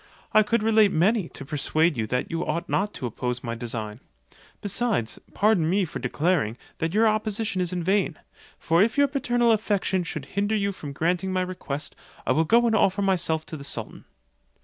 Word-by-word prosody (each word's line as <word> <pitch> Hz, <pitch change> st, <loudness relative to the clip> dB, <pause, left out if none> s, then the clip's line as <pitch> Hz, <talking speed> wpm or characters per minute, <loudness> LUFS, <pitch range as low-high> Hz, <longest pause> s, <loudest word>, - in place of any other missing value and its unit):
I 215 Hz, -, +7 dB
could 230 Hz, +1 st, +1 dB
relate 220 Hz, -2 st, +5 dB
many, 190 Hz, +3 st, +2 dB
to 140 Hz, -, -9 dB
persuade 155 Hz, +3 st, +1 dB
you 110 Hz, -3 st, -2 dB
that 125 Hz, +3 st, -2 dB
you 165 Hz, +1 st, -1 dB
ought 170 Hz, +3 st, -2 dB
not 205 Hz, +1 st, 0 dB
to -, -, -5 dB
oppose 125 Hz, +1 st, -3 dB
my 115 Hz, -, -3 dB
design. 115 Hz, -2 st, -5 dB, 0.6 s
Besides, 205 Hz, -, -1 dB, 0.2 s
pardon 200 Hz, -6 st, +3 dB
me 195 Hz, +1 st, +2 dB
for 155 Hz, -, -6 dB
declaring, 130 Hz, -2 st, 0 dB, 0.2 s
that 165 Hz, +3 st, -1 dB
your 225 Hz, +1 st, +5 dB
opposition 215 Hz, -2 st, 0 dB
is 180 Hz, -1 st, -2 dB
vain; 180 Hz, -1 st, 0 dB, 0.4 s
for 165 Hz, +2 st, +2 dB
if 220 Hz, +4 st, +2 dB
your 285 Hz, 0 st, +5 dB
paternal 245 Hz, -4 st, +1 dB
affection 205 Hz, -4 st, +1 dB
should 155 Hz, -4 st, -5 dB
hinder 205 Hz, +2 st, +1 dB
you 200 Hz, -1 st, 0 dB
from 150 Hz, -7 st, -8 dB
granting 175 Hz, +6 st, 0 dB
my 185 Hz, 0 st, +1 dB
request, 150 Hz, -6 st, -5 dB, 0.3 s
I -, -, +1 dB
will 160 Hz, +5 st, +3 dB
go 235 Hz, +6 st, +4 dB
and 230 Hz, -, +2 dB
offer 200 Hz, -1 st, +2 dB
myself 165 Hz, -5 st, +1 dB
to 160 Hz, -, -7 dB
the 140 Hz, -, -9 dB
sultan." 140 Hz, -, -6 dB
180 Hz, 190 wpm, -25 LUFS, 150-210 Hz, 0.6 s, I